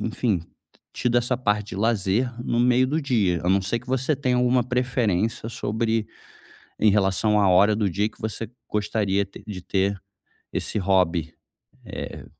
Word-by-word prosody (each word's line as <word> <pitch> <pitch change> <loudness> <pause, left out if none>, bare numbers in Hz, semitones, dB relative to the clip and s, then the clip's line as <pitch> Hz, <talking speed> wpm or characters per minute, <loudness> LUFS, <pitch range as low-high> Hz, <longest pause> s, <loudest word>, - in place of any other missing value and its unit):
enfim, 110 -4 0 0.5
tido 120 0 +1
essa 120 +1 0
parte 105 -4 -1
de 95 - -6
lazer 110 +3 +1
no 120 - -1
meio 125 +1 +4
do 150 +5 0
dia. 105 - +1
A - - +1
não 100 +1 +4
ser 100 +5 -1
que 120 - -16
você 130 +3 0
tenha 130 -3 0
alguma 125 0 +2
preferência 120 -4 0
sobre 110 0 -1 0.7
em 110 - +5
relação 105 +1 +2
à 100 - +4
hora 100 +4 +5
do 105 -3 0
dia 100 +4 0
que 110 - -23
você 110 0 -3 0.2
gostaria 105 -2 0
te 100 - -13
de 100 -4 -6
ter 95 +1 0 0.5
esse - - -2
hobby. 90 -4 +1 0.5
Eh - - -7
110 Hz, 165 wpm, -24 LUFS, 100-120 Hz, 0.7 s, em